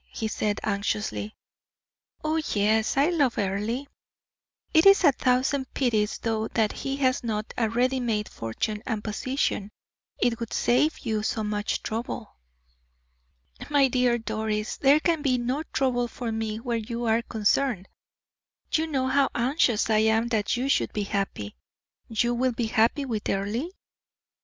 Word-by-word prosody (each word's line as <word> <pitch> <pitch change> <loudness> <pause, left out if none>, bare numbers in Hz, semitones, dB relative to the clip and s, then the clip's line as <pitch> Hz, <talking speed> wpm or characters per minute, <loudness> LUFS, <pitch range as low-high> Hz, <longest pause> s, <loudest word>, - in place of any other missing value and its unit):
he 220 - -3
said, 210 -1 -1
anxiously. 210 +1 -2 0.9
"Oh, 315 +1 +1
yes, 215 +4 +2
I 290 +6 +4
love 285 -8 +1
Earle. 210 +7 -1 0.9
It 320 +4 +6
is 395 -1 +7
a 295 - +7
thousand 260 +1 0
pities, 220 -5 +1
though, 225 -1 -1
that 220 -2 +1
he 275 0 -4
has 255 -3 +1
not 215 -2 -3
a 230 -2 +1
ready 250 +3 +1
made 220 -4 -1
fortune 210 - -4
and 220 -4 -2
position 215 -2 -1 0.5
it 240 -1 +1
would 230 -2 -5
save 300 +6 +2
you 220 -2 0
so 220 +1 -1
much 210 0 -2
trouble." 225 0 -5 1.3
"My 285 -2 +4
dear 250 -1 +2
Doris, 220 -1 -2
there 280 +2 +5
can 325 -1 +1
be 265 -3 +2
no 250 +4 -1
trouble 245 -2 +1
for 235 0 -5
me 220 -1 -2
where 235 -1 -2
you 235 +2 -4
are 225 +1 +2
concerned; 220 -2 0 0.8
you 320 0 +1
know 270 -4 0
how 270 +1 +3
anxious 245 -2 +2
I 215 -1 +3
am 220 +2 +2
that 220 0 0
you 255 +2 -1
should 275 - +1
be 210 - -1
happy. 195 - -3 0.5
You 235 +2 +1
will 250 +1 +1
be 235 0 -1
happy 230 +6 +2
with 225 -5 -3
Earle?" 210 - -1
235 Hz, 150 wpm, -26 LUFS, 215-260 Hz, 1.3 s, is